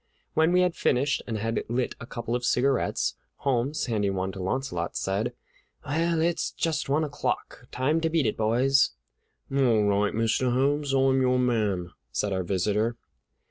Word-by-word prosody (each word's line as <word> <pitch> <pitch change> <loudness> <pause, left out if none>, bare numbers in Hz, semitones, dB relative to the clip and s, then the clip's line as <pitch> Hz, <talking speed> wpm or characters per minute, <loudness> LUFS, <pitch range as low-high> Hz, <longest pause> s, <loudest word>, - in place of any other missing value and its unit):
When 160 +2 +3
we 180 0 +4
had 180 -1 +2
finished 135 +3 +1
and 115 -2 -2
had 115 +2 -1
lit 120 +1 -1
a 115 - -9
couple 120 -1 -4
of 125 - -2
cigarettes, 125 - +1 0.2
Holmes, 135 +3 0
handing 105 -5 0
one 95 0 -1
to 95 - -7
Launcelot, 95 -4 -2
said: 100 +5 -1 0.5
"Well, 165 +3 +1
it's 170 +1 +1
just 155 -4 -2
one 150 +3 +2
o'clock. 145 -3 -3
Time 150 +6 +1
to 165 - +1
beat 160 -4 +1
it, 110 - +1
boys!" 125 +5 +3 0.6
"All 120 -6 +3
right, 105 0 +1
Mr. 115 +3 +1
Holmes, 140 +3 +1
I'm 135 0 +3
your 125 0 +3
man," 105 -8 0 0.2
said 100 +10 -1
our 95 - 0
visitor. 105 +5 0
125 Hz, 165 wpm, -27 LUFS, 105-140 Hz, 0.6 s, we